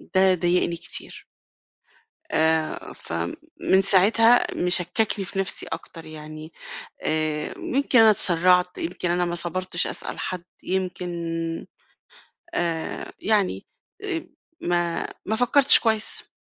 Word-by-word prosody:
ده 190 0 +5
ضايقني 175 0 0
كتير. - - -1 1.1
آآ 160 0 0
فمن 85 - -2
ساعتها 215 +5 +5
مشككني 180 +3 0
في 195 +1 -5
نفسي 195 - -2
أكتر 165 0 -8
يعني 155 0 -10 0.5
آآ 155 -1 -2
يمكن 265 -2 +1
أنا 220 -1 +7
اتسرعت، 180 -1 +3
يمكن 175 +1 -3
أنا 175 0 0
ما 175 0 -3
صبرتش 180 +1 -1
أسأل - - -4
حد، 180 -2 -4 0.2
يمكن 180 -1 -3 1.4
آآ 165 -2 -3
يعني 210 -4 0 0.4
آآ 350 -5 -3 0.4
ما 175 -1 -1 0.2
ما 220 - -1
فكرتش 265 +4 +7
كويس. 220 -2 0
180 Hz, 105 wpm, -23 LUFS, 165-200 Hz, 1.4 s, أنا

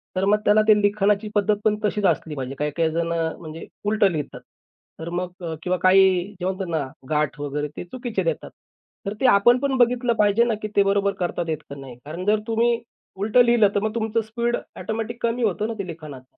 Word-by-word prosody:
तर 185 +1 +1
मग 210 +1 +4
त्याला 210 +1 +5
ते 215 - +7
लिखाणाची 205 +1 +2
पद्धत 210 +1 +3
पण 215 -1 +4
तशीच 210 -1 0
असली 155 -4 0
पाहिजे. 135 0 -5
काही-काही 150 +2 0
जण 170 +1 -1 0.3
म्हणजे 160 -1 -8 0.2
उलटं 210 -2 +3
लिहितात. 150 -3 -5 0.6
तर 165 +1 -5
मग 175 -2 -4
किंवा 180 0 0
काही 185 -1 +5 0.2
जे 180 - -3
म्हणतात 190 0 -2
ना 155 -4 -1 0.2
गाठ 150 -1 0
वगैरे 145 +1 -2
ते - - -4
चुकीचे 240 +4 -4
देतात. - - -2 0.6
तर 200 - -2
ते - - +2
आपण 240 +5 +5
पण 275 -1 0
बघितलं 245 0 +3
पाहिजे 210 +2 +4
ना, 235 - +1
की 215 - -3
ते 200 - +5
बरोबर 200 0 +1
करता 175 -1 -2
आहेत 155 -1 -1
का 140 - -7
नाही. 130 -3 -10
कारण 170 +5 -6
जर 210 +1 +3
तुम्ही 230 +1 +2 0.4
उलटं 215 +5 +4
लिहिलं 235 -3 +5
तर - - +4
मग 220 +1 -2
तुमचं 225 0 0
स्पीड 235 +2 -2 0.2
ऑटोमॅटिक 225 +2 -4
कमी 235 +1 0
होतं 210 0 0
ना 230 - -3
ते 195 - -3
लिखाणाच. 155 -6 -9
200 Hz, 205 wpm, -23 LUFS, 170-225 Hz, 0.6 s, ते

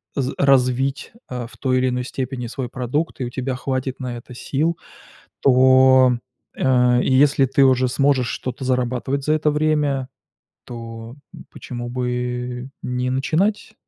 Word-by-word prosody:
з 135 -2 -1
развить, 135 0 +2 0.2
э, 125 -2 -5
в - - -16
той 130 -1 0
или 130 0 +2
иной 125 0 -2
степени 130 -2 -4
свой 125 0 -5
продукт 135 +6 -3
и - - -1
у 120 - -4
тебя 130 +1 -3
хватит 130 +1 -3
на 125 -2 -4
это 125 +1 -12
сил, 155 +7 -1 0.6
то, 130 -1 +5 0.4
э, 125 -2 +3
если 135 +1 +4
ты 135 +2 +3
уже 130 -1 +3
сможешь 135 -1 +2
что-то 130 +1 -5
зарабатывать 130 +2 -1
за 155 - +1
это 155 0 +1
время, 150 -3 0 0.6
то 115 0 -8 0.4
почему 120 -1 -7
бы 125 0 -3
не 125 0 -2
начинать? 190 +12 0
130 Hz, 145 wpm, -21 LUFS, 125-135 Hz, 0.6 s, то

